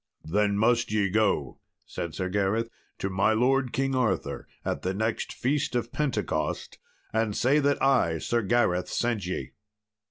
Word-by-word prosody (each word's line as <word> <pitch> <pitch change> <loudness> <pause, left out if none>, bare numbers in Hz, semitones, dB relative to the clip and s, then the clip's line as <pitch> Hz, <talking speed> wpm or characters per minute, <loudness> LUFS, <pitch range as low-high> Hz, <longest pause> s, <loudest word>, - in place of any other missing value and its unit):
"Then 100 +4 +1
must 120 +1 +2
ye 100 -3 +1
go," 100 - +1 0.3
said 85 -2 -5
Sir 95 - -2
Gareth, 100 +4 0 0.3
"to - - -2
my 100 +4 +3
lord 125 +2 +2
King 135 +1 0
Arthur 120 -7 -1 0.2
at - - -2
the 95 +1 -2
next 110 +2 -1
Feast 140 0 -1
of 120 -1 -1
Pentecost 110 - -2 0.3
and 110 -2 0
say 140 +4 +3
that 145 -1 +2
I, 125 -12 +3
Sir 120 +8 0
Gareth, 95 -5 +1
sent 115 -6 -1
ye." 95 - -4
110 Hz, 155 wpm, -27 LUFS, 95-125 Hz, 0.3 s, my